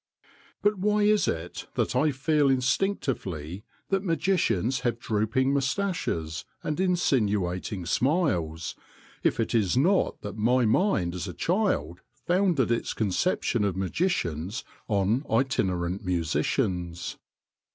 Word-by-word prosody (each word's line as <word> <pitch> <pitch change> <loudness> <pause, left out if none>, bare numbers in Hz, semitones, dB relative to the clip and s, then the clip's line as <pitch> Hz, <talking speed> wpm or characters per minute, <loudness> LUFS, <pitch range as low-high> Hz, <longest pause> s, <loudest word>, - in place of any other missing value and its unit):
But 205 -1 +2
why 210 +2 +2
is 210 -1 +3
it 80 +2 -4
that - - 0
I 150 +5 +3
feel 145 +1 +2
instinctively 125 - -1 0.2
that 195 0 +1
magicians 155 - +1
have 120 -2 -1
drooping 115 +5 0
moustaches 135 - -1 0.2
and 155 +2 -2
insinuating 105 - 0
smiles, 90 - 0 0.5
if - - +1
it 115 - 0
is 110 -2 +2
not 185 +8 +2
that 105 - -5
my 120 +3 +3
mind 110 - +2
as 90 +2 -4
a 90 - -6
child 90 - 0 0.3
founded 175 - +2
its 115 - -1
conception 110 - 0
of 95 -3 0
magicians 95 - -1 0.2
on 105 +5 +1
itinerant 95 -7 0
musicians? 90 - -1
115 Hz, 115 wpm, -27 LUFS, -, 0.5 s, is